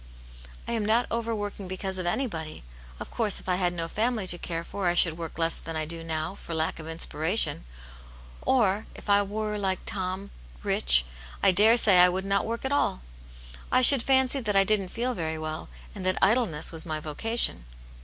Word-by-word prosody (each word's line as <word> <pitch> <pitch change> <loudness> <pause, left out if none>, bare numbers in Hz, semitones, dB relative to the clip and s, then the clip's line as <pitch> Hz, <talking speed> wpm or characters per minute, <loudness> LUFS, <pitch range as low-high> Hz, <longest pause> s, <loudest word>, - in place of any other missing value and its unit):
" - - -19
I - - -4
am 230 -2 -1
not 225 +4 +2
over 230 0 -2
working 205 -2 -5
because 190 0 -4
of 180 - -3
anybody. 170 - -4 0.4
Of - - -9
course, 220 -4 -1
if - - -15
I 180 -1 +1
had 180 -1 0
no 165 -1 -4
family 220 +2 -1
to 175 -1 -1
care 165 -1 -4
for, 195 +1 -4
I 175 - +1
should 165 -2 +4
work 165 -2 -8
less 165 0 0
than 165 - -8
I 155 0 -2
do 165 +1 -7
now, 160 +1 -4
for 170 -4 -8
lack 160 +1 -2
of 160 - -9
inspiration; 160 - 0 0.8
or, 215 -5 +1
if 205 - -5
I 200 0 +5
were 210 +2 -4
rich, 210 -1 -4
like 190 -1 -1
Tom, 190 +1 -4 1.1
I - - +6
dare 215 +5 +5
say 200 -6 +4
I 180 0 +7
should 190 +2 -3
not 195 +1 0
work 230 +3 -4
at 265 - -2
all. 285 - 0 0.7
I 255 - +3
should 270 0 +9
fancy 265 +1 +2
that 210 -5 -3
I 195 - +5
didn't 195 -1 0
feel 240 +6 -3
very 160 -6 -4
well, 155 0 -6 0.2
and 195 - -8
that 185 - 0
idleness 200 -8 +1
was 165 -1 -2
my 155 -3 -4
vocation." 155 - +2
190 Hz, 205 wpm, -26 LUFS, 165-220 Hz, 1.1 s, should